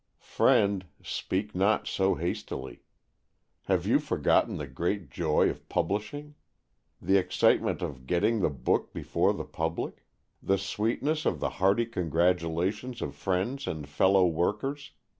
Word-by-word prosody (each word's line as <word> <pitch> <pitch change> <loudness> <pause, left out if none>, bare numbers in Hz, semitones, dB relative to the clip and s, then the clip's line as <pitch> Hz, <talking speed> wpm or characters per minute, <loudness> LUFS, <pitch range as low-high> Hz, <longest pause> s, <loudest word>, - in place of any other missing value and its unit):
Friend, 100 -2 +2 0.2
speak 105 +3 -3
not 100 +4 +2
so 95 0 +1
hastily. 85 +2 -4 0.8
Have - - +1
you - - +4
forgotten - - +1
the 75 - -4
great 85 +8 -3
joy 80 -3 +2
of - - -12
publishing? 145 +9 -2 0.7
the 95 - +3
excitement 95 - +2
of 65 -3 -6
getting 105 - +2
the 95 - +2
book 65 -4 -1
before - - +1
the - - -4
public? 80 +1 -4 0.4
the 95 - +2
sweetness 115 - -1
of - - 0
the - - 0
hearty 100 +5 +4
congratulations 90 - 0
of 70 - -4
friends 95 - -2
and 75 -3 -4
fellow 95 +6 +4
workers? 105 - -1
95 Hz, 130 wpm, -28 LUFS, 85-105 Hz, 0.8 s, you